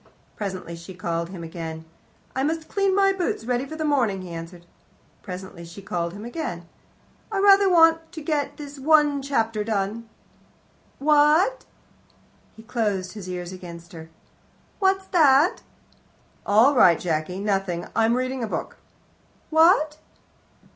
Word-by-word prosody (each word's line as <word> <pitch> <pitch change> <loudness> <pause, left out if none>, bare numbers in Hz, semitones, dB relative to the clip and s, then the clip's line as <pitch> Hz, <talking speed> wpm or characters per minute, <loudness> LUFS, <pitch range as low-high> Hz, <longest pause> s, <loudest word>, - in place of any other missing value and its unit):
Presently 185 -4 -5
she 170 +3 -11
called 170 -1 -3
him 180 -3 -8
again. 160 -1 -7 0.5
"I 265 - 0
must 315 +3 -2
clean 395 -1 +1
my 390 -1 +4
boots 355 -11 -2
ready 250 +2 -1
for 315 - -7
the 315 0 -3
morning," 235 -10 +1
he 180 - -9
answered. 170 +1 -9 0.6
Presently 185 -2 -8
she 170 +4 -11
called 170 -2 -3
him 205 +3 -8
again. 235 - -5 0.6
"I 410 - -2
rather 395 0 +6
want 325 -1 +4
to 330 - -6
get 290 -2 -2
this 285 -1 -9 0.4
chapter 225 -6 -1
done." 215 +2 -3 0.9
"What?" 305 - +3 0.9
He 220 - -14
closed 210 -6 -2
his 200 -4 -9
ears 180 -1 -5
against 170 -2 -11
her. 160 -1 -10 0.7
"What's 385 -1 +2
that?" 300 -1 +4 0.9
"All 225 +8 +5
right, 175 - +5
Jacky, 165 +2 -2
nothing; 195 -4 -1
I'm 225 +1 +3
reading 255 0 -2
a - - -2
book." - - -5 0.7
"What?" 315 -1 +4
225 Hz, 135 wpm, -24 LUFS, 180-305 Hz, 0.9 s, rather